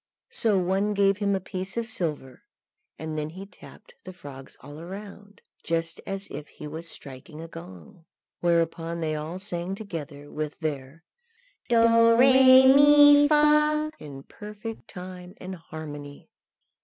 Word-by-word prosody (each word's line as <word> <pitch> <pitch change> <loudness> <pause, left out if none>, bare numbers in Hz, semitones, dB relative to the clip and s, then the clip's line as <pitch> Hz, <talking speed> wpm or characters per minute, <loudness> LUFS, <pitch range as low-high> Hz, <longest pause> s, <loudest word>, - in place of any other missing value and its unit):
Some 200 -6 +1
one 195 +3 0
gave 195 -1 +3
him 200 -1 +1
a - - -1
piece 185 +2 -6
of 235 - -1
silver, 155 - -5 0.6
and 155 -1 -5
then 150 0 -4
he 185 +5 -9
tapped 205 +2 -16
the 185 - -9
frogs 140 -7 -12
all 145 +3 -11
round, 200 +2 -11 0.2
just 165 0 -3
as 195 0 -5
if 150 +1 -7
he - - -12
was 160 +3 -7
striking 140 +3 -11
a 165 - -8
gong; 90 - -13 0.3
whereupon 170 0 0
they 155 -1 -1
all 155 +4 -5
sang 185 -1 -5
together, 155 -8 -8
with 150 -1 -5
their 150 0 -5 0.7
Do, 240 - +3
Ré, 260 +3 +6
Mi, 290 0 +7
Fa, 300 0 +3
in 140 -2 -10
perfect 210 +4 -9
time 180 0 -10
and 185 +1 -7
harmony. 150 -4 -10
180 Hz, 145 wpm, -26 LUFS, 155-210 Hz, 0.7 s, Mi